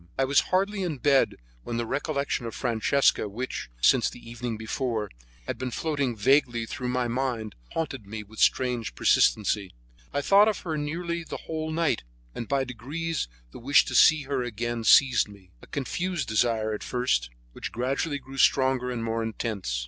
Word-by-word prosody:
I 135 - +2
was 140 +2 +4
hardly 195 +2 +1
in 170 -6 -2
bed 135 +1 +3 0.3
when 115 - -4
the 120 - -1
recollection 140 -1 -2
of 115 - -7
Francesca 120 -1 +2
which, 120 - -5
since - - +4
the - - -12
evening 120 -1 -4
before, 110 -2 -2 0.3
had - - -4
been 130 0 -2
floating 140 -2 -1
vaguely 120 +1 +2
through 125 +2 -5
my 125 0 0
mind, 120 -4 -2 0.2
haunted 135 -10 -3
me 105 +1 -6
with 110 +2 -13
strange 120 - +1
persistency. 100 - +2 0.4
I 145 - -1
thought 200 +7 +6
of 215 -3 0
her 160 -3 -3
nearly 170 +3 -3
the - - -8
whole 160 -1 -3
night, 160 -6 +1 0.3
and 115 - -5
by 140 -1 +1
degrees 140 - -4 0.2
the - - -10
wish 135 +4 +4
to - - -5
see 155 -1 +6
her 140 -1 -2
again 120 0 -3
seized 130 0 +6
me, 100 -3 -16
a - - -14
confused 170 +4 -2
desire 110 0 +1
at 105 - -5
first, 125 - 0 0.2
which - - -6
gradually 135 +5 -1
grew 135 0 -10
stronger 130 -2 +3
and 120 -2 -3
more 115 0 -1
intense. 110 - -3
125 Hz, 175 wpm, -27 LUFS, 115-145 Hz, 0.4 s, thought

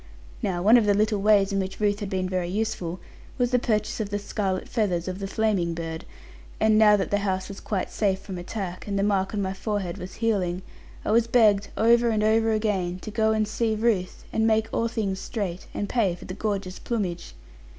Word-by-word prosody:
Now 175 -2 -1
one 220 +5 +7
of 220 -3 +2
the 205 - +4
little 210 0 +1
ways 200 -1 +4
in 195 - +1
which 190 0 -4
Ruth 205 -1 +1
had 205 -3 -4
been 185 -2 -1
very 185 -1 -1
useful, 185 -4 -2 0.4
was 245 -1 +1
the 250 - +4
purchase 215 -2 -1
of 210 -2 -2
the 205 - -1
scarlet 200 -2 -2
feathers 185 -7 0
of 185 +1 -4
the 195 - -3
flaming 195 -5 0
bird; 165 -1 -5 0.5
and 220 0 +4
now 215 -1 +6
that 195 - -2
the 205 - +2
house 190 -2 -1
was 200 - -8
quite 195 -4 -3
safe 195 -3 +1
from 190 -2 -7
attack, 180 0 -5
and 200 -1 -1
the 195 - +1
mark 195 -2 +1
on 200 - 0
my 190 0 -2
forehead 195 -3 -3
was 180 +1 -8
healing, 190 -6 0 0.4
I - - 0
was 230 +1 +4
begged, 215 -4 +4
over 235 +1 +4
and 215 -2 +1
over 225 +1 +3
again, 200 -5 0
to 215 - -7
go 220 0 +2
and 215 -1 +1
see 220 +1 0
Ruth, 210 -5 0
and 220 0 +2
make 220 0 +2
all 230 - +1
things 200 -4 -2
straight, 190 -5 -4
and 205 - -3
pay 200 -8 +1
for - - -12
the 185 - -6
gorgeous 195 -2 -3
plumage. 180 - -3
205 Hz, 220 wpm, -25 LUFS, 185-220 Hz, 0.5 s, one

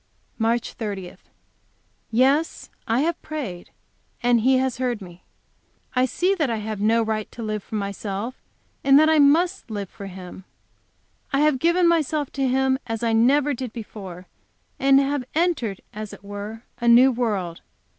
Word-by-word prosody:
MARCH, 230 +1 0
30. 200 -5 -5 0.9
Yes, 270 +7 +1 0.2
I 230 +3 +2
have 330 +2 -1
prayed, 255 - -6 0.5
and 240 -1 +4
He 260 +3 +4
has 260 -1 -1
heard 245 -3 -1
me. 180 -2 -12 0.7
I 250 0 +4
see 365 +8 +1
that 315 -8 0
I 230 - 0
have 215 -1 -4
no 225 +2 +3
right 215 -1 -3
to 235 - -7
live 215 -1 -2
for 220 - -8
myself, 200 +3 -4 0.4
and 275 0 +6
that 310 +1 +5
I 315 - +4
must 330 +4 +3
live 205 -3 -5
for 200 - -8
Him. 185 0 -10 0.9
I 275 0 +2
have 300 -3 +3
given 340 +3 +3
myself 310 -3 +1
to 270 -1 0
Him 265 +1 +2
as 225 0 -3
I 230 -1 +2
never 280 +6 +4
did 250 -2 -5
before, 195 -6 -8 0.5
and 270 0 +5
have 275 -1 0
entered, 310 - 0
as 215 0 -6
it - - -12
were, 205 +3 -7 0.2
a 235 - -1
new 245 +3 +7
world. 205 -9 -2
240 Hz, 165 wpm, -23 LUFS, 210-275 Hz, 0.9 s, new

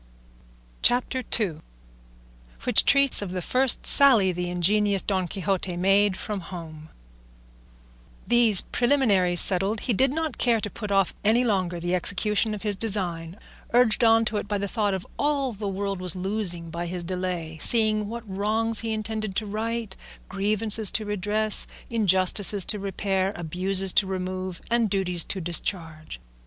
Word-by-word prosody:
CHAPTER 250 +1 0 0.2
II. 185 -8 -2 1.1
WHICH - - +3
TREATS 275 -4 +4
OF 200 - -5
THE 180 - -4
FIRST 255 +4 +2
SALLY 235 -10 +4
THE 180 0 -5
INGENIOUS 200 +3 +1
DON 190 -3 -2
QUIXOTE 190 -1 -3
MADE 195 +1 +1
FROM 210 -3 -5
HOME 160 -3 -11 1.4
These 235 -5 +4
preliminaries 210 -9 +2
settled, 195 +3 +1
he 245 - -2
did 260 +5 +1
not 315 -2 -4
care 235 -2 +2
to 205 -1 -6
put 210 0 -7
off 195 -2 +1
any 225 +4 +2
longer 185 -6 -2
the 175 +1 -3
execution 210 +4 0
of 205 - -10
his 210 -2 -1
design, 180 -5 -2 0.4
urged 240 -1 +3
on 225 0 +3
to 215 -1 -3
it 205 - -5
by 205 0 -2
the 200 0 -4
thought 205 -2 -2
of 190 - -7
all 285 -3 -1
the 205 -1 -7
world 195 0 -4
was 180 -1 +1
losing 180 -3 -2
by 170 +1 -5
his 175 0 -6
delay, 175 -3 -5
seeing 215 -2 +4
what 230 +1 -8
wrongs 215 +3 -1
he 225 -1 -4
intended 215 -2 -5
to 215 - -2
right, 220 0 -5 0.3
grievances 210 +2 +2
to 215 - -3
redress, 210 +1 +4 0.2
injustices 195 -2 +3
to 210 - -3
repair, 195 0 -3
abuses 185 +3 0
to 195 - +2
remove, 185 -1 -5
and 235 -2 +1
duties 180 -3 +1
to 195 - -6
discharge. 165 - -2
200 Hz, 155 wpm, -24 LUFS, 185-220 Hz, 1.4 s, TREATS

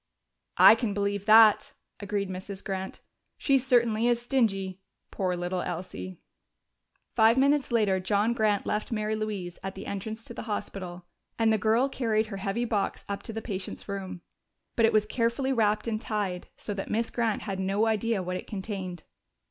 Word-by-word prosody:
"I - - +10
can 225 -3 -1
believe 200 0 -1
that," 220 -1 +7 0.3
agreed 200 -1 -2
Mrs. 190 +1 -7
Grant. 190 -1 -5 0.4
"She 275 -2 +3
certainly 235 -3 +2
is 240 -1 +3
stingy. 195 -7 0 0.3
Poor 185 -2 -1
little 175 +1 -2
Elsie!" 95 - -5 1.0
Five 225 +1 +5
minutes 280 0 +3
later 210 -5 +2
John 205 +4 +1
Grant 215 -3 +1
left 210 +3 -2
Mary 215 -1 -1
Louise 205 -5 -4
at 195 0 -5
the 195 - -8
entrance 220 +3 -5
to - - -8
the - - -6
hospital, 180 -4 -5 0.3
and 225 -1 +3
the 220 - +1
girl 225 +6 +3
carried 225 -5 0
her - - -4
heavy 195 +5 -1
box 210 -4 -1
up 200 0 -4
to - - -7
the 225 0 -5
patient's 190 -4 -5
room. 190 -3 -5 0.5
But 230 -1 +5
it - - +2
was 215 -1 +4
carefully 235 +4 0
wrapped 215 -2 +1
and 220 -1 -1
tied, 200 -6 -3
so 205 - -5
that 195 -1 -5
Miss 230 +2 0
Grant 230 -3 0
had 195 -3 -4
no 195 +3 +1
idea 220 -2 0
what 180 0 -3
it - - -9
contained. 190 -4 -5
210 Hz, 175 wpm, -28 LUFS, 190-225 Hz, 1.0 s, I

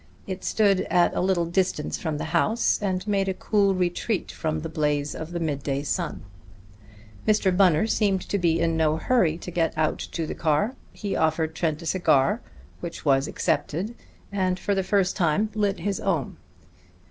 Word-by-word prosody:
It 190 -1 -5
stood 200 -3 +3
at 175 -1 +3
a - - 0
little 180 -2 +2
distance 175 -3 -1
from 160 -3 -2
the - - -4
house, 220 +8 +2
and 190 -2 -1
made 195 -2 +1
a 190 - -1
cool 200 -2 +2
retreat 180 +3 -1
from 155 -1 -2
the 165 - -4
blaze 150 -2 -1
of 160 +1 -7
the 170 - -3
mid 150 -4 -2
day 140 0 -2
sun. 145 - -2 1.0
Mr. 210 -4 +3
Bunner 180 -2 +4
seemed 200 -4 +1
to 200 - 0
be 165 -2 +2
in 165 -1 +1
no 160 -1 +2
hurry 170 -5 +2
to 180 - -8
get 165 -2 0
out 155 -1 0
the 160 -2 -3
car. 165 - +1 0.2
He 205 -2 -4
offered 160 0 +1
Trent 160 0 -1
a - - -8
cigar, 175 - +2 0.4
which 170 -2 -7
was 135 0 +3
accepted, 190 +10 -1 0.4
and 185 -2 0
for 200 - -1
the 195 - +1
first 190 -1 +1
time 190 +4 +1
lit 205 -2 0
his 200 -2 -1
own. 170 -8 -1
175 Hz, 180 wpm, -25 LUFS, 160-195 Hz, 1.0 s, Bunner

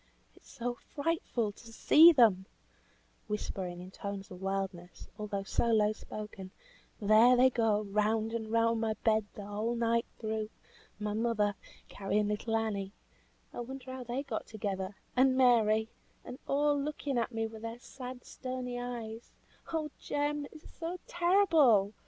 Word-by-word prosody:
"It - - -20
is - - -23
so 245 +1 -3 0.2
frightful 285 -8 -1
to 230 +3 -14
see 320 +8 +8
them," 215 - +4 0.8
whispering 190 -4 -4
in 180 +1 -9
tones 200 0 -6
of 180 0 -9
wildness, 190 -2 -4
although 205 -2 -3
so 215 - 0
low 215 -2 +4
spoken. 210 -3 -8 0.5
"There 220 +4 +6
they 260 +1 +6
go 220 -3 +2
round 215 +2 0
and 220 -1 -3
round 230 0 +2
my 220 -1 0
bed 220 -2 +3
the 205 - -7
whole 215 +3 -2
night 230 0 +1
through. 220 -1 -3 0.5
My 210 0 -2
mother, 215 -2 +1 0.3
carrying 205 +1 -1
little 215 +2 -1
Annie 205 -3 -2 0.6
(I - - -6
wonder 260 +1 -7
how 260 -1 -6
they 245 +3 -3
got 250 -6 -4
together) 200 -3 -4 0.2
and 260 +1 +4
Mary 220 -4 +4 0.4
and 250 - -8
all 290 0 +2
looking 285 -3 -2
at 235 - -1
me 225 -1 -1
with 220 0 -8
their 230 +1 -5
sad, 250 0 -9
stony 255 -1 -5
eyes; 235 -2 -6 0.4
oh 310 -2 -2
Jem! 290 0 -1
it - - -14
is - - -14
so 340 +2 -3
terrible! 330 - +4
225 Hz, 155 wpm, -32 LUFS, 210-255 Hz, 0.8 s, see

